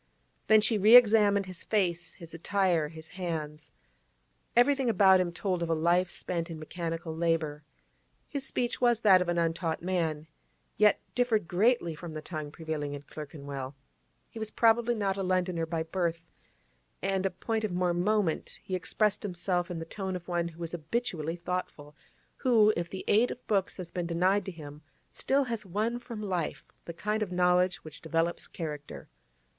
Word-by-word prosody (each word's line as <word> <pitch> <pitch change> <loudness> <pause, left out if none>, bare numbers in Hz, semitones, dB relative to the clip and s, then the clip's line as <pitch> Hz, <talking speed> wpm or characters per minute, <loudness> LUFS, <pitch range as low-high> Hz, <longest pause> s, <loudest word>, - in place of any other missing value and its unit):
Then 215 0 +7
she 215 0 +3
re 215 +5 +7
examined 210 -4 +6
his 185 -2 -8
face, 175 -5 -1
his 165 -2 -11
attire, 175 -2 +1
his 160 +1 -10
hands. 155 -5 -5 0.8
Everything 265 +1 +4
about 190 -3 +6
him 180 -1 0
told 180 0 -2
of 170 - -2
a 165 - +2
life 175 +3 +2
spent 170 -1 -3
in 165 - -6
mechanical 165 0 -5
labour. 160 -3 0 0.6
His 280 - -4
speech 245 -2 -2
was 240 -2 +3
that 190 -4 +6
of 180 - -1
an 175 - 0
untaught 165 0 -1
man, 165 -4 -1 0.5
yet 210 -1 +4
differed 230 -7 +1
greatly 195 -1 +2
from 160 0 -8
the 155 - -4
tongue 155 -3 -5
prevailing 155 -3 -4
in 145 - -9
Clerkenwell; 140 -2 -7 0.5
he 225 - -10
was 220 -1 -4
probably 235 +1 +3
not 200 -3 -1
a - - -2
Londoner 180 -3 0
by 160 -1 -1
birth, 170 -1 -2 0.8
and—a 195 0 +1
point 220 +4 -3
of 215 - -1
more 180 0 +1
moment—he 185 0 -1
expressed 210 +3 0
himself 180 -2 -1
in 175 - -4
the 165 - -5
tone 190 +2 -4
of 175 -1 -7
one 175 -1 0
who 170 0 -8
is 165 - -4
habitually 170 -1 -2
thoughtful, 175 -4 -5 0.4
who, 220 -4 +4
if 170 0 -3
the 190 - -7
aid 225 +4 +4
of 250 - -8
books 195 -3 0
has 180 -3 -7
been 175 -2 -3
denied 185 +4 +2
to 190 - -4
him, 150 -3 -10 0.3
still 275 +1 +1
has 230 -4 -4
won 215 +6 -1
from 230 -3 -7
life 180 -5 -3 0.2
the - - -5
kind 210 +5 -2
of 205 -3 -2
knowledge 180 0 +3
which 155 -1 -11
develops 165 +1 -1
character. 150 -4 -7
180 Hz, 170 wpm, -29 LUFS, 165-210 Hz, 0.8 s, Then